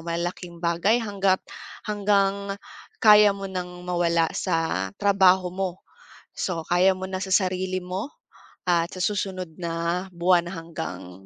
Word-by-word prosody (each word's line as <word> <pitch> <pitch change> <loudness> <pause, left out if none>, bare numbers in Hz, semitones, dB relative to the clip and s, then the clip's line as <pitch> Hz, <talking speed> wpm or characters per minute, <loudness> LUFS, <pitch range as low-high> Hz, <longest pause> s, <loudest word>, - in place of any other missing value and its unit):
malalaking 170 +1 -4
bagay, 170 +6 +2
hangga't 195 -3 +1 0.4
hanggang 200 -1 +1 0.4
kaya 210 -2 +7
mo 195 - -7
nang 180 -2 -6
mawala 170 -2 +2
sa 160 - -1
trabaho 190 -2 +4
mo. 190 0 -1 0.7
So 175 -3 -2
kaya 185 +2 +4
mo 190 0 -6
na 185 - -3
sa 190 0 -2
sarili 185 -1 +1
mo 185 +9 -5 0.6
at 170 0 +2
sa 185 - -5
susunod 185 -4 -2
na 170 +1 -2
buwan 175 0 +3
hanggang 160 - -7
185 Hz, 130 wpm, -25 LUFS, 170-195 Hz, 0.7 s, kaya